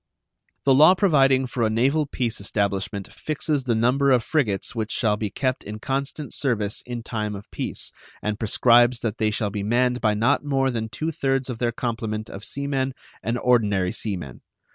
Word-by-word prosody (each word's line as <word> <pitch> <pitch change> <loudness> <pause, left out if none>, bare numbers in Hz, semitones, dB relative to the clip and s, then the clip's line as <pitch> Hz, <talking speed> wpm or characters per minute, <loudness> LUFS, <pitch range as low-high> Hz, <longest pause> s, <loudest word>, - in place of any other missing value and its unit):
The 135 - +5
law 155 +7 +7
providing 135 -8 +4
for 125 -1 -4
a 110 - +3
naval 135 +7 +2
peace 120 -6 -2
establishment 100 -1 -2
fixes 150 -2 -2
the 120 -2 +1
number 125 +5 +2
of 125 -3 +4
frigates 110 -11 0
which 110 -2 -3
shall 110 -4 +1
be 105 0 -3
kept 130 +5 -2
in 105 +1 -6
constant 135 +5 -3
service 110 -7 0
in 120 -1 -5
time 105 -3 -3
of 100 +1 -9
peace, - - -5 0.3
and 105 0 -3
prescribes 120 +2 +4
that 110 -3 -3
they 110 -1 +2
shall 105 -1 -1
be 105 0 -3
manned 125 +4 +1
by 110 -2 +2
not 120 +8 +2
more 135 -2 +1
than 110 -2 -3
two 155 +9 -3
thirds 135 -3 -1
of 115 - -7
their 120 -1 +1
complement 115 -2 -3
of 100 - -8
sea 140 +5 -3
men 135 -1 -1 0.3
and 115 +4 -1
ordinary 105 -7 +2
sea 105 -4 -3
men. 70 -7 -9
120 Hz, 190 wpm, -24 LUFS, 105-135 Hz, 0.3 s, law